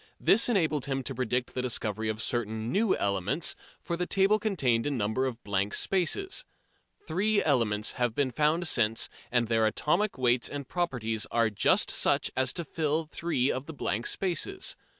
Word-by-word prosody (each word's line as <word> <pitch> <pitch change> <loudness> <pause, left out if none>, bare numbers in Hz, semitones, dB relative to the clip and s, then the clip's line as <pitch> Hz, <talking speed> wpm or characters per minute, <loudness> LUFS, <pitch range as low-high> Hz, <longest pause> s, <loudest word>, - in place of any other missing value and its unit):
This 230 +4 +3
enabled 160 - +1
him 135 -1 -2
to 135 - -4
predict 125 0 -2
the 130 - -2
discovery 110 -3 -2
of 110 +1 -3
certain 110 -1 -2
new 210 +1 +2
elements, 100 - 0 0.2
for 170 - -3
the 180 +1 -2
table 200 +2 +3
contained 140 - +1
a - - +1
number 125 0 0
of 120 -2 -6
blank 100 0 -1
spaces. 285 - 0 0.6
Three 205 +6 +1
elements 110 -8 +1
have 120 -2 -1
been 140 -3 +1
found 155 +6 +1
since, 115 -6 +2 0.2
and 120 -2 +2
their 110 -1 +2
atomic 175 - 0
weights 125 -1 +2
and 140 -2 -6
properties 120 -11 -2
are 115 -1 +2
just 105 - +3
such - - +1
as 130 -1 +1
to 170 - -4
fill 155 +1 -1
three 150 -4 -1
of 130 +2 -4
the 160 - -7
blank 115 -4 -2
spaces. 195 - -1
130 Hz, 170 wpm, -29 LUFS, 115-170 Hz, 0.6 s, This